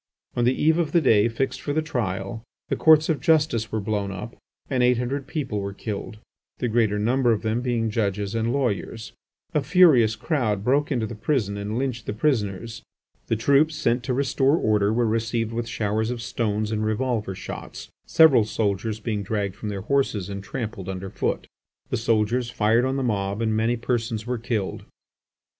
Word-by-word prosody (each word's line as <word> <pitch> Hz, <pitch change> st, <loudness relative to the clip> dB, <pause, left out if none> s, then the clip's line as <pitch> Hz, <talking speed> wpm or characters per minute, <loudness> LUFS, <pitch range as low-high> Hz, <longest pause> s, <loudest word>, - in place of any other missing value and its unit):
On 120 Hz, -, +1 dB
the 125 Hz, +2 st, +2 dB
eve 160 Hz, +2 st, +3 dB
of 155 Hz, -3 st, -1 dB
the 170 Hz, -, +6 dB
day 115 Hz, -7 st, +4 dB
fixed 130 Hz, +2 st, -2 dB
for 145 Hz, -, -2 dB
the 155 Hz, -, +1 dB
trial 105 Hz, -7 st, -3 dB, 0.3 s
the -, -, +1 dB
Courts 155 Hz, -1 st, +5 dB
of 155 Hz, -4 st, 0 dB
justice 145 Hz, -8 st, +2 dB
were 110 Hz, -, -1 dB
blown 100 Hz, -1 st, -2 dB
up 105 Hz, +5 st, -7 dB, 0.3 s
and 130 Hz, -2 st, 0 dB
eight 125 Hz, 0 st, +4 dB
hundred 130 Hz, +3 st, -3 dB
people 135 Hz, -10 st, -3 dB
were 100 Hz, 0 st, -4 dB
killed, 105 Hz, 0 st, -5 dB, 0.4 s
the 125 Hz, -, -1 dB
greater 110 Hz, -3 st, +2 dB
number 120 Hz, +4 st, +2 dB
of 110 Hz, -, 0 dB
them 110 Hz, +2 st, 0 dB
being 120 Hz, -3 st, 0 dB
judges 100 Hz, -2 st, -1 dB
and 115 Hz, +1 st, 0 dB
lawyers. 115 Hz, -4 st, -2 dB, 0.4 s
A 150 Hz, -, +2 dB
furious 135 Hz, -, +5 dB
crowd 110 Hz, -, -1 dB
broke 140 Hz, +5 st, +2 dB
into 120 Hz, -5 st, 0 dB
the 115 Hz, -, -6 dB
prison 110 Hz, -2 st, -1 dB
and 100 Hz, +2 st, -3 dB
lynched 125 Hz, -4 st, -3 dB
the -, -, -2 dB
prisoners. 115 Hz, -3 st, -1 dB, 0.5 s
The 115 Hz, -, +1 dB
troops 140 Hz, +7 st, +3 dB
sent 125 Hz, -5 st, +1 dB
to 130 Hz, -, 0 dB
restore 135 Hz, +2 st, +2 dB
order 105 Hz, -4 st, +2 dB
were 120 Hz, +2 st, +2 dB
received 115 Hz, 0 st, -1 dB
with 115 Hz, 0 st, -3 dB
showers 110 Hz, 0 st, -1 dB
of 125 Hz, -1 st, -3 dB
stones 110 Hz, -2 st, -2 dB
and 110 Hz, -1 st, -1 dB
revolver 110 Hz, -2 st, -1 dB
shots; -, -, -8 dB, 0.2 s
several 145 Hz, -8 st, +6 dB
soldiers 105 Hz, 0 st, -1 dB
being 110 Hz, -2 st, -2 dB
dragged 100 Hz, -1 st, -2 dB
from 105 Hz, -, -5 dB
their 100 Hz, -2 st, -4 dB
horses 110 Hz, -5 st, 0 dB
and 100 Hz, 0 st, -5 dB
trampled 105 Hz, -3 st, -5 dB
underfoot. 95 Hz, 0 st, -3 dB, 0.5 s
The -, -, +1 dB
soldiers 115 Hz, +2 st, +1 dB
fired 115 Hz, 0 st, +2 dB
on 130 Hz, +1 st, 0 dB
the 135 Hz, -, -1 dB
mob 100 Hz, -3 st, -1 dB
and 110 Hz, -1 st, 0 dB
many 115 Hz, +2 st, +1 dB
persons 115 Hz, -2 st, -2 dB
were 125 Hz, -1 st, -2 dB
killed. 110 Hz, -4 st, -3 dB
115 Hz, 185 wpm, -24 LUFS, 105-130 Hz, 0.5 s, the